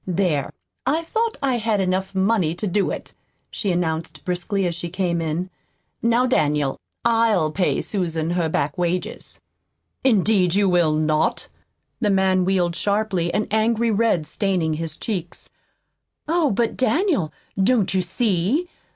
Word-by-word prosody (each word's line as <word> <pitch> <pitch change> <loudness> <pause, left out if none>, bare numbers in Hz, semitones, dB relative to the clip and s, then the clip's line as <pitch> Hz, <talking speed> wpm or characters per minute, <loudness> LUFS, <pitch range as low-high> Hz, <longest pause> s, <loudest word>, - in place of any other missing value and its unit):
"There, 175 -6 0 0.3
I 305 +6 0
thought 450 +6 -1
I 260 -3 +1
had 220 -2 0
enough 190 +1 -1
money 190 -4 +2
to 180 - -4
do 200 +1 +1
it," - - -6 0.4
she 200 - -1
announced 165 -2 -2
briskly 185 +2 -1
as 175 - 0
she 170 0 -5
came 175 -2 -1
in. 165 +4 -2 0.5
"Now, 235 +2 +3
Daniel, 150 - +1 0.3
I'LL 225 -9 +3
pay 180 +2 0
Susan 165 -5 -2
her 175 -2 0
back 145 +1 -1
wages." 175 +1 -3 0.6
"Indeed 200 -6 +3
you 200 0 +3
will 175 -4 +3
not!" 155 0 0 0.5
The 215 -4 +1
man 190 -2 +3
wheeled 180 -3 +1
sharply, 200 -4 0
an 210 - 0
angry 225 +1 +2
red 210 -7 +2
staining 175 -1 0
his 160 0 -4
cheeks. 180 -6 -5 0.8
"Oh, 325 -2 +2
but 225 +1 0
Daniel, 295 - +1 0.3
don't 215 -3 +2
you 190 - +2
see? 200 - 0
190 Hz, 140 wpm, -22 LUFS, 170-220 Hz, 0.8 s, Now